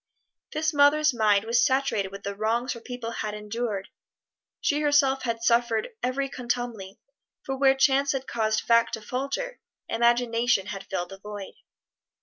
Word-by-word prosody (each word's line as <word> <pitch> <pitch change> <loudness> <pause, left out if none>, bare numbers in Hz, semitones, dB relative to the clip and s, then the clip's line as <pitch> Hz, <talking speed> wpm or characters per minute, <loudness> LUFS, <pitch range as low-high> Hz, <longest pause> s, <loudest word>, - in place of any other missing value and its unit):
This 310 0 0
mother's 290 +1 +4
mind 210 -3 +3
was 235 +2 +3
saturated 260 -8 +1
with 195 0 -9
the 200 - -3
wrongs 230 +4 -1
her 235 - -9
people 240 -1 -6
had 215 -2 -4
endured: 210 -1 -4 0.7
she 295 +1 +1
herself 285 -2 +3
had 230 -2 -3
suffered 235 - +2
every 270 +2 -1
contumely, 240 -6 -4 0.5
for 270 - -3
where 270 0 +4
chance 270 +1 +3
had 270 -1 -3
caused 220 -3 0
fact 230 -1 +3
to 220 - -11
falter, 275 - -3 0.3
imagination 235 -2 +2
had 195 -1 -7
filled 175 -2 -3
the 195 - -10
void. 205 -1 -8
235 Hz, 150 wpm, -26 LUFS, 215-270 Hz, 0.7 s, mother's